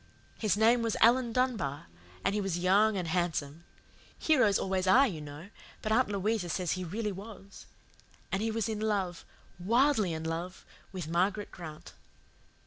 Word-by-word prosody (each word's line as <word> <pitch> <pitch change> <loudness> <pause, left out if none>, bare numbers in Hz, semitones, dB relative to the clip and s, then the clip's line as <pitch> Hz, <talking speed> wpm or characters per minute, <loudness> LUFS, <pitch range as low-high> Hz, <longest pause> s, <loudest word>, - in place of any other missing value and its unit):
His 210 -4 +1
name 230 +3 +4
was 230 -1 -1
Alan 240 +1 +4
Dunbar, 225 - -1 0.4
and 195 - +2
he 210 - 0
was 195 -3 -2
young 200 +4 +3
and 180 -2 -2
handsome. 165 -2 -2 0.5
Heroes 255 -11 +3
always 190 -1 -1
are, 260 +9 +6
you 165 -9 -5
know, 150 +5 -9 0.3
but 215 - -2
Aunt 250 +2 +3
Louisa 200 -1 -1
says 180 0 -1
he 185 - -2
really 210 +5 -3
was. 200 0 -11 0.6
And 195 - 0
he 225 - 0
was 225 -1 -1
in 220 -2 -3
love 200 -5 -1 0.4
wildly 230 +1 +2
in 160 0 -4
love, 170 +3 -5 0.3
with 180 -5 -5
Margaret 190 +5 0
Grant. 155 -3 -10
195 Hz, 160 wpm, -30 LUFS, 175-220 Hz, 0.6 s, are